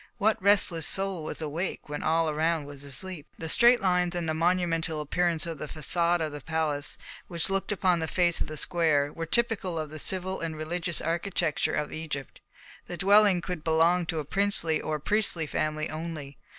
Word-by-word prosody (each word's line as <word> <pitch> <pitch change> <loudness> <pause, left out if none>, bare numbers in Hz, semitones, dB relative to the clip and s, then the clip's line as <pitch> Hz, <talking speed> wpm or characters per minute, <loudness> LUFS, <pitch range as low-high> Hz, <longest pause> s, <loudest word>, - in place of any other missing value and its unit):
What 220 -2 +1
restless 190 -5 +3
soul 195 -4 0
was 160 - -5
awake 160 +5 -4
when 150 0 -5
all 165 +1 +2
around 155 0 0
was 140 -1 -8
asleep? 155 +3 -4
The 165 - -5
straight 240 +8 +6
lines 180 -1 +1
and 175 -2 -2
the 160 - 0
monumental 165 -1 0
appearance 170 +2 0
of 165 -3 -5
the 150 - -5
façade 170 +3 +1
of 155 -1 -2
the 145 0 -7
palace, 155 -2 -1 0.3
which 170 +1 0
looked 195 +1 -1
upon 185 -3 +2
the 160 - -2
face 175 0 +1
of - - -1
the 155 - -7
square, 150 -4 +2
were 165 0 -5
typical 205 -4 0
of 155 -2 -4
the 155 - -7
civil 190 +3 0
and 160 -1 -4
religious 170 +2 -2
architecture 170 -1 -1
of 150 - -2
Egypt. 150 -4 -6 0.5
The 175 - -6
dwelling 200 -1 +5
could 175 -3 -5
belong 165 +2 +3
to 165 - -2
a 150 - -3
princely 195 -2 0
or 155 - -2
a - - -4
priestly 200 -2 0
family 155 +1 -2
only. 155 -3 -6
165 Hz, 190 wpm, -28 LUFS, 155-180 Hz, 0.5 s, straight